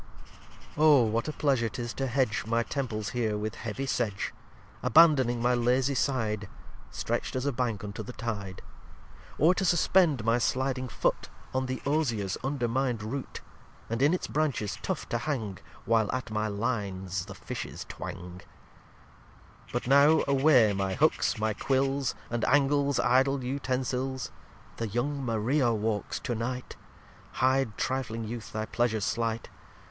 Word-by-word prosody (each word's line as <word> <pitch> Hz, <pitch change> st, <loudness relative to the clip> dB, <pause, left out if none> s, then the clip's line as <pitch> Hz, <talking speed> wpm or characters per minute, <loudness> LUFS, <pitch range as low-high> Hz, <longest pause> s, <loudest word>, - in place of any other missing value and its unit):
lxxxi -, -, -20 dB
Oh 150 Hz, -4 st, +6 dB
what 115 Hz, +3 st, 0 dB
a -, -, -1 dB
Pleasure 135 Hz, -7 st, +1 dB
'tis 120 Hz, +1 st, -5 dB
to 135 Hz, -, -2 dB
hedge 125 Hz, -3 st, 0 dB
My 115 Hz, +1 st, +2 dB
Temples 115 Hz, -6 st, -3 dB
here 110 Hz, -2 st, -1 dB
with 110 Hz, +1 st, -3 dB
heavy 120 Hz, +4 st, -4 dB
sedge; 110 Hz, -6 st, -1 dB, 0.5 s
Abandoning 140 Hz, -7 st, +5 dB
my 125 Hz, +1 st, +3 dB
lazy 125 Hz, +3 st, +2 dB
Side, 110 Hz, -7 st, -1 dB, 0.4 s
Stretcht -, -, -2 dB
as 130 Hz, +1 st, -1 dB
a 140 Hz, -, +2 dB
Bank 120 Hz, -5 st, -2 dB
unto 105 Hz, +1 st, -5 dB
the 110 Hz, -, -7 dB
Tide; 100 Hz, -6 st, -5 dB, 0.7 s
Or 165 Hz, +4 st, +5 dB
to 190 Hz, -, -1 dB
suspend 170 Hz, -, +3 dB
my 115 Hz, +1 st, +3 dB
sliding 130 Hz, +1 st, 0 dB
Foot -, -, -1 dB, 0.2 s
On 130 Hz, 0 st, 0 dB
the 130 Hz, 0 st, -4 dB
Osiers 120 Hz, -, 0 dB
undermined 130 Hz, -3 st, -1 dB
Root, 130 Hz, +5 st, -5 dB, 0.5 s
And 115 Hz, +2 st, -1 dB
in 145 Hz, +3 st, +5 dB
its 180 Hz, -, -1 dB
Branches 140 Hz, -10 st, -1 dB
tough -, -, -3 dB
to 120 Hz, -, 0 dB
hang, 115 Hz, -, -3 dB, 0.3 s
While 110 Hz, -2 st, +2 dB
at 130 Hz, -3 st, -3 dB
my 110 Hz, 0 st, 0 dB
Lines 100 Hz, -4 st, -2 dB
the 95 Hz, -, -8 dB
Fishes -, -, -6 dB
twang! 90 Hz, 0 st, -7 dB
lxxxii -, -, -25 dB
But 120 Hz, -, -2 dB
now 140 Hz, +4 st, +6 dB
away 135 Hz, -6 st, +5 dB
my 95 Hz, -1 st, -1 dB
Hooks, 150 Hz, -2 st, +2 dB
my 110 Hz, 0 st, 0 dB
Quills, 135 Hz, +3 st, 0 dB, 0.2 s
And 120 Hz, -1 st, -1 dB
Angles, 140 Hz, -1 st, +3 dB
idle 130 Hz, +2 st, +3 dB
Utensils. 130 Hz, 0 st, -2 dB, 0.5 s
The 115 Hz, -, -2 dB
young 135 Hz, +6 st, -2 dB
Maria 120 Hz, +3 st, +1 dB
walks 110 Hz, -1 st, -1 dB
to 120 Hz, -, -2 dB
night: 125 Hz, +2 st, -4 dB, 0.6 s
Hide 130 Hz, -3 st, +1 dB
trifling 115 Hz, -4 st, -2 dB
Youth 110 Hz, 0 st, -6 dB
thy 110 Hz, 0 st, -2 dB
Pleasures 110 Hz, -2 st, 0 dB
slight. 115 Hz, -1 st, -1 dB
120 Hz, 150 wpm, -29 LUFS, 110-135 Hz, 0.7 s, Oh